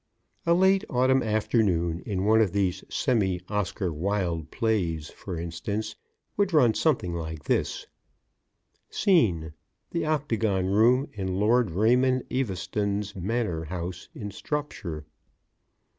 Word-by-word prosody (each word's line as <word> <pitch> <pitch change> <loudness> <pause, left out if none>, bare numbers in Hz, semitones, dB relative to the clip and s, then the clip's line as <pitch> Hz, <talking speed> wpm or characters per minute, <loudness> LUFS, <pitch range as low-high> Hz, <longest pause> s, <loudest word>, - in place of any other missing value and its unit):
"] - - -43
A 170 - +5
late 190 +2 +4
Autumn 130 +1 +3
afternoon 100 -7 +1
in 95 -2 -1
one 110 +1 +5
of 100 -5 +1
these 95 -3 0
semi 95 -7 +1
Oscar 100 -3 -1
Wilde 85 -2 -1
plays, 85 -9 -1
for 90 -4 -7
instance, 105 +6 -4 0.4
would 200 -3 +1
run 125 -8 +5
something 125 - +1
like 80 -2 -5
this: - - -1 1.0
SCENE 90 - +2 0.4
_The 165 -2 -1
Octagon 115 -11 0
Room 115 +8 +4
in 95 -4 -3
Lord 110 +3 +3
Raymond 125 +8 +3
Eaveston's 100 -3 -2
Manor 95 -4 -2
House 90 +2 -6
in 105 -2 -6
Stropshire. 100 - -4
105 Hz, 120 wpm, -27 LUFS, 90-125 Hz, 1.0 s, A